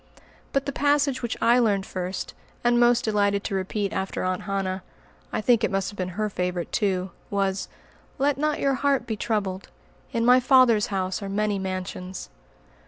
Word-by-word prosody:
But 275 0 0
the 280 - -2
passage 285 -2 +2
which 235 -2 -3
I 240 +2 +5
learned 205 -5 +2
first, 185 0 -4 0.3
and 240 0 +4
most 240 0 +4
delighted 200 -2 +1
to 205 - -3
repeat 195 +1 -2
after 190 0 -2
Aunt 185 0 -1
Hannah, 195 -1 -2 0.5
I - - -1
think 235 0 +3
it - - +3
must 195 0 -1
have - - -13
been 185 0 -4
her 215 0 +1
favorite 180 -3 -3
too, 190 -4 0 0.2
was, 195 -1 -1 0.5
"Let 280 +1 +2
not 305 0 0
your 275 -1 +2
heart 275 -2 +1
be 225 -3 -2
troubled. 200 -3 -2 0.4
In 230 -2 0
my 250 +1 +7
Father's 250 -4 +5
house 190 -1 -2
are 200 - -5
many 205 0 0
mansions." 185 - -5
205 Hz, 175 wpm, -25 LUFS, 190-240 Hz, 0.5 s, my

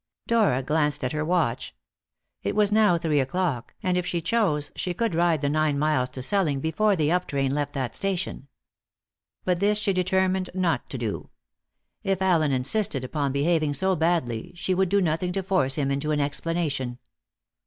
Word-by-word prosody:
Dora 210 - +2
glanced 150 0 0
at 130 - -1
her 155 0 -1
watch. 155 -8 -1 0.7
It - - -2
was 210 -1 +3
now 210 -4 +4
three 160 -3 +1
o'clock, 135 -2 -2
and 185 -1 +1
if - - -2
she 175 - -1
chose 165 -6 0
she 180 -1 -3
could 230 -1 0
ride 165 -2 +2
the 145 - 0
nine 155 -1 +1
miles 140 -4 +1
to 130 0 -5
Selling 155 -4 +1
before 200 +8 +1
the 155 -3 +1
up 180 +1 +1
train 135 -1 0
left 145 0 -2
that 130 -3 -3
station. 190 -7 -3 1.0
But 180 -2 +1
this 205 +2 +2
she 205 -2 0
determined 185 0 +1
not 180 -3 0
to - - -4
do. - - -4 0.7
If 195 -4 0
Allen 170 -6 +2
insisted 135 +2 0
upon 140 +1 -1
behaving 150 +1 +1
so 190 +6 +1
badly, 160 -9 -1
she 185 +2 -1
would 190 0 +1
do 200 +1 +3
nothing 170 +1 0
to 195 0 -2
force 180 -8 +1
him 140 -2 0
into 140 +2 -1
an 150 -1 +1
explanation. 145 -4 -2
165 Hz, 180 wpm, -25 LUFS, 140-185 Hz, 1.0 s, now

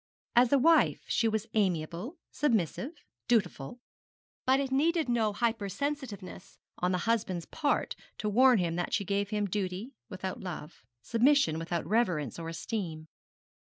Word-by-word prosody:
As 240 0 +5
a 280 - +6
wife 325 +5 +4
she 230 - +2
was 220 -1 0
amiable, 185 - -1
submissive, 245 - 0 0.3
dutiful; 210 - 0 0.7
but 265 +1 +5
it 275 -1 -2
needed 320 +3 +2
no 230 -3 +2
hypersensitiveness 220 -1 -3 0.2
on 180 +1 +1
the 180 - +1
husband's 190 -7 0
part 295 -3 -1 0.2
to 210 - -3
warn 250 +4 +5
him 170 -3 0
that 175 - -2
she 200 - -1
gave 200 +1 0
him 210 -1 0
duty 200 +5 -3 0.2
without 185 -2 -5
love, 175 -4 -7 0.2
submission 235 - +3
without 170 0 -2
reverence 180 - 0
or 165 0 -5
esteem. 165 -3 -4
210 Hz, 140 wpm, -30 LUFS, 180-250 Hz, 0.7 s, a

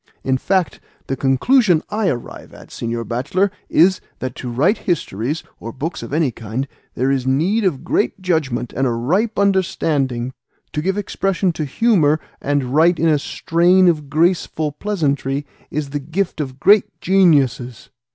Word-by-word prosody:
In 130 -1 0
fact, 185 0 0 0.3
the 135 - -2
conclusion 165 - +3
I 210 -2 +1
arrive 120 -3 -6
at, - - -14
señor 115 0 -4
bachelor, 185 +12 0 0.2
is, 185 +3 +4 0.2
that 130 - -4
to 125 - -5
write 160 - +2
histories, 145 - -2 0.2
or 115 - -6
books 150 +8 -5
of - - -8
any 150 -3 +1
kind, 115 +4 -5 0.3
there 130 +2 +1
is 130 -2 -1
need 175 +12 +1
of 150 -8 0
great 125 - 0
judgment 150 -10 -1
and 135 +1 0
a - - 0
ripe 180 - 0
understanding. 150 -10 0 0.4
To 150 - -1
give 190 +4 -1
expression 195 -2 0
to 155 -1 -3
humour, 155 - +2 0.2
and 140 -3 -1
write 165 +3 +4
in 165 +1 +2
a 150 -2 +3
strain 175 +5 +3
of 150 -5 +1
graceful 160 -1 +1
pleasantry, 145 -6 -2 0.2
is 145 -2 -4
the 145 - -2
gift 160 +4 -2
of 130 -2 -6
great 200 +4 +4
geniuses. 140 - +2
150 Hz, 160 wpm, -19 LUFS, 130-185 Hz, 0.4 s, is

